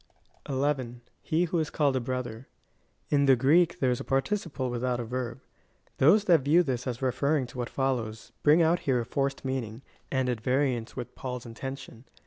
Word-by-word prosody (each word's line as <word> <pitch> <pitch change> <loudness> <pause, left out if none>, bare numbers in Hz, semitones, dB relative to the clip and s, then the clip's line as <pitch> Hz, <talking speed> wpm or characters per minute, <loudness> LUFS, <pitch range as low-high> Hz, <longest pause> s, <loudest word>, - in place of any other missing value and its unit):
11. 130 -3 -1
If - - -35 0.2
he 160 +3 +3
who 175 0 0
is 155 - -1
called 145 -3 +1
a - - +2
brother. 125 -1 -4 0.6
In 140 -1 +3
the 135 - +7
Greek 165 +8 +3
there 130 -4 +2
is 125 - -1
a - - -5
participle^ 135 -2 -1
without 125 0 -1
a - - -2
verb.* 125 +1 -4 0.6
Those 195 +10 +6
that 170 -7 +4
view 155 +6 +4
this 130 -4 -3
as 125 +1 -4
refer 140 +4 +1
ring 135 -4 0
to 125 - -10
what 120 - -2
follows, 120 -5 -2
bring 155 +3 +5
out 165 +2 +3
here 130 -3 +1
a - - -5
forced 135 +2 -2
meaning, 130 -2 -3 0.3
and 130 -1 +1
at 120 -3 -2
variance 125 -2 0
with 125 -2 -6
Paul's 125 -2 -6
intention. 130 +1 -8
130 Hz, 195 wpm, -28 LUFS, 125-145 Hz, 0.6 s, the